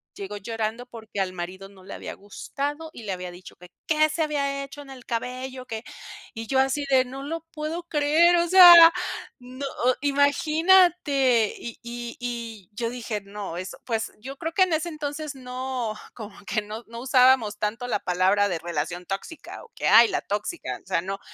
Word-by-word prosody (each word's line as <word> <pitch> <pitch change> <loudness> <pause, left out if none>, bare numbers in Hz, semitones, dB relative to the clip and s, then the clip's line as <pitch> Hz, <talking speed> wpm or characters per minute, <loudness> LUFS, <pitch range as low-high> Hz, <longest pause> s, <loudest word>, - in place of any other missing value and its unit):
llegó 200 +1 -6
llorando 225 +3 -4
porque 220 -4 -6
al 185 -1 -1
marido 185 +2 -7
no 195 -2 -17
le - - -8
había - - -7
gustado 290 +9 -5
y 235 - -10
le 200 -3 -3
había 180 -1 -6
dicho 180 +1 -13
que: 180 0 -15 0.2
"¿Qué 310 0 +3
se 310 +2 -2
había 280 -2 -1
hecho 290 +1 -11
en 280 - -13
el 260 -2 -11
cabello?, 255 +2 -4
que" 225 -2 -6 0.5
y 225 0 -7
yo 265 - +2
así 270 +2 +1
de: 260 -1 +4
"No 270 +2 -8
lo 325 +2 -5
puedo 315 +3 -4
creer", 325 +2 +3
o 340 0 +2
sea, 345 -3 +10 0.5
no, 255 +2 -8 0.2
o 255 - +4
imagínate, 285 - +3
y 235 - -8
y 240 0 -7
y 230 -5 -6
yo 230 +1 -2
dije: 230 -3 -4
"No", 200 -3 -7
eso, 185 +1 -7
pues, 225 -2 -2
yo 265 +5 -8
creo 325 - -4
que 375 - +5
en 360 -3 0
ese 315 +2 0
entonces 300 -1 -5
no, 255 -3 -4 0.2
como 215 -3 -10
que 215 +1 -1
no 215 +3 -8
no 230 0 -9
usábamos 255 -4 +4
tanto 230 +4 -2
la 205 - 0
palabra 190 +3 +2
de 175 - -2
relación 170 +2 -4
tóxica, 200 - -7
o 475 - -18
que: - - -2
"Ay, 230 +1 +7
la - - 0
tóxica", 210 - -4
o - - -37
sea, 185 -3 0
no. 195 +2 -5
245 Hz, 195 wpm, -25 LUFS, 210-290 Hz, 0.5 s, sea